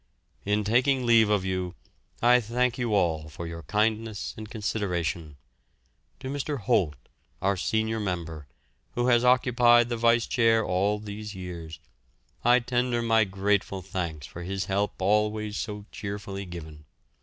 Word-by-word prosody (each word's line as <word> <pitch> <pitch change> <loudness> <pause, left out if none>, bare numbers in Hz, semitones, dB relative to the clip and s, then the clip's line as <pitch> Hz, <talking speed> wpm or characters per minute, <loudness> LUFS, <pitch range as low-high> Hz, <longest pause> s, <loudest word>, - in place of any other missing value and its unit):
In 105 +1 +1
taking 125 +4 +2
leave 115 -2 +5
of 105 -3 +1
you 95 -1 -2 0.5
I 125 +1 +6
thank 120 +2 0
you 115 -3 0
all 80 -5 +1
for 85 +3 -7
your 85 0 -6
kindness 110 +2 -1
and 110 -1 -8
consideration. 90 -8 -2 0.8
To - - -5
Mr. 140 -1 -3
Holt, 85 -6 +2 0.4
our 100 +1 +1
senior 110 +3 -1
member, 85 -7 -4 0.5
who 120 +1 +1
has 120 -1 +4
occupied 120 -1 +5
the 120 - -1
vice 115 0 +3
chair 115 -2 +3
all 95 +3 +1
these 105 0 -7
years, 85 -3 -7 0.7
I 120 +1 +6
tender 120 -1 0
my 115 -1 +4
grateful 95 0 -1
thanks 85 -6 -4
for 85 +6 -9
his 95 +2 -3
help 100 +1 -1
always 105 +2 +1
so 105 -1 -5
cheerfully 100 -1 -5
given. 80 -4 -9
105 Hz, 145 wpm, -27 LUFS, 90-115 Hz, 0.8 s, I